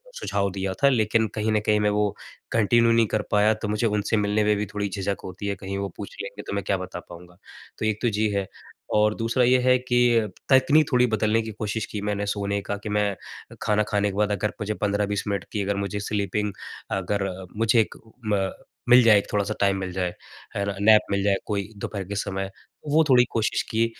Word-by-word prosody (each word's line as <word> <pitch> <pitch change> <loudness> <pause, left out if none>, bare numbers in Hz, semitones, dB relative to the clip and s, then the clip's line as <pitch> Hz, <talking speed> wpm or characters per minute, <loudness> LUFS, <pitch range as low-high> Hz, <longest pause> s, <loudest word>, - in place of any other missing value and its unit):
सुझाव 100 - -1
दिया 95 0 -3
था, 140 - +7
लेकिन 110 -3 +2
कहीं 110 0 0
न 110 - +3
कहीं 105 0 +3
मैं 105 0 +2
वो 105 0 0 0.4
कंटिन्यू 115 +1 +4
नहीं 115 0 +4
कर 110 +1 0
पाया 105 +1 +4
तो 110 0 -5
मुझे 105 +2 0
उनसे 105 +1 0
मिलने 105 +1 +1
में 105 0 +3
भी 105 - -1
थोड़ी 105 -1 -1
झिझक 100 0 -2
होती 100 +2 -6
है, 100 - -1
कहीं 95 +1 -5
वो 100 0 -3
पूछ 100 - -8
लेंगे 100 +1 -7
तो - - -4
मैं 100 -1 -2
क्या 100 - +1
बता 90 -1 -6
पाऊँगा। 90 +1 -13 0.4
तो - - -1
एक 110 -1 0
तो 120 - +2
जी 110 +1 +2
है 100 -1 -1 0.5
और 105 0 +3
दूसरा 115 +2 +1
ये 125 +1 +5
है 125 0 +4
कि 120 -1 +3
अ, 110 - -1 0.2
तकनीक 140 +3 +5
थोड़ी 125 -1 +4
बदलने 110 0 +1
की 110 0 -6
कोशिश 110 +1 -3
की 105 - -4
मैंने 105 0 -2
सोने 100 0 -1
का 100 +1 -4
कि - - -4
मैं 105 -1 +1 0.5
खाना 105 0 +2
खाने 105 -1 +1
के - - -9
बाद 105 0 +2
अगर 105 +1 -1
मुझे 105 +1 -1
15-20 100 0 0
मिनट 100 -1 -1
की 105 - -2
अगर 100 +1 -1
मुझे 100 +1 -3
स्लीपिंग 105 0 -2 0.4
अगर, 95 +1 -1 0.3
मुझे 115 +1 +3
एक, 110 - -4 0.3
म 100 -2 0 0.4
मिल 125 +1 +9
जाए 110 -3 +7
एक 100 - 0
थोड़ा-सा 105 +1 0
टाइम 100 -1 +2
मिल 95 -1 -4
जाए, 90 -1 -2 0.4
अर 100 0 -1
नैप 110 +1 +7
मिल 100 0 +1
जाए 100 -1 +3
कोई 100 -2 -2
दोपहर 100 0 -4
के 100 +2 -6
समय, 95 -1 -2
तो 150 - -15
वो 160 +2 +5
थोड़ी 125 -2 +7
कोशिश 110 -2 0
की। 115 +1 +2
105 Hz, 225 wpm, -25 LUFS, 100-110 Hz, 0.5 s, मिल